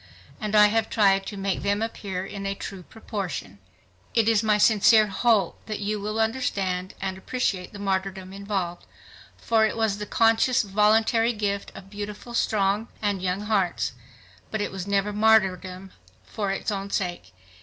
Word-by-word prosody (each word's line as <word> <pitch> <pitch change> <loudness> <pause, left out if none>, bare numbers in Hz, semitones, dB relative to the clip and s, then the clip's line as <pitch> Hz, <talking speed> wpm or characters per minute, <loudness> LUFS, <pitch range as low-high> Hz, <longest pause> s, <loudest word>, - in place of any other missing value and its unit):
And 215 -2 -2
I 210 0 +8
have 220 +1 +1
tried 195 -2 +3
to 205 - -6
make 195 0 -1
them 205 +2 0
appear 195 -4 -4
in 195 0 -6
a 195 - -2
true 195 -1 -7
proportion. 185 - -6 0.6
It 225 -2 +3
is 225 -2 +4
my 215 -2 +3
sincere 215 +1 +5
hope 210 +1 +1
that 215 -1 -3
you 210 +1 -2
will 215 +2 -3
understand 200 -6 -1
and 190 -1 -4
appreciate 195 -5 -2
the 205 - -9
martyrdom 190 -1 -3
involved, 195 -3 -4 0.5
for 225 -1 +2
it 220 +1 +1
was 220 -3 0
the 210 - -5
conscious 225 +3 +3
voluntary 220 +3 +3
gift 200 -2 -2
of 195 +1 -12
beautiful, 210 +3 -7
strong 210 -1 +1
and 205 -3 -1
young 185 +1 -1
hearts. 205 -4 0 0.6
But 220 - -3
it 205 - -2
was 190 0 -6
never 200 +1 +1
martyrdom 190 -3 +2 0.3
for 205 -3 -3
its 195 - -2
own 200 0 -4
sake. 175 - -3
205 Hz, 165 wpm, -25 LUFS, 195-220 Hz, 0.6 s, I